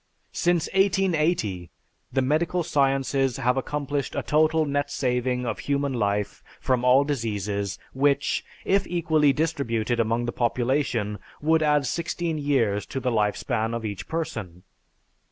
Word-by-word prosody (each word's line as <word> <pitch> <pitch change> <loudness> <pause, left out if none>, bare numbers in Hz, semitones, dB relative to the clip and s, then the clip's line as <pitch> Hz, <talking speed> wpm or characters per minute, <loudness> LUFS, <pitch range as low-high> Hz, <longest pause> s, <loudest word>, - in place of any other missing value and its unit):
Since 175 -2 +1
1880, 170 - +1 0.4
the 135 - +1
medical 165 +6 +1
sciences 135 -4 +1
have 125 -1 +1
accomplished 145 0 -2
a - - -1
total 155 +1 +3
net 145 0 -1
saving 125 -2 -1
of 110 -4 -3
human 140 -1 -1
life 105 -3 -1 0.2
from 125 -2 0
all 125 +2 +5
diseases 105 -7 -2 0.2
which, 140 +1 +1 0.2
if 195 0 +2
equally 160 -4 +2
distributed 125 -6 -1
among 115 +1 +1
the 120 - -2
population, 120 -3 0 0.2
would 160 +2 +2
add 150 -2 +3
sixteen 170 +2 -2
years 120 -8 +1
to 135 - -4
the 125 -1 -1
life 105 -2 +1
span 115 -2 -1
of 115 -1 -4
each 100 -3 -5
person. 110 - -4
135 Hz, 135 wpm, -25 LUFS, 115-155 Hz, 0.4 s, all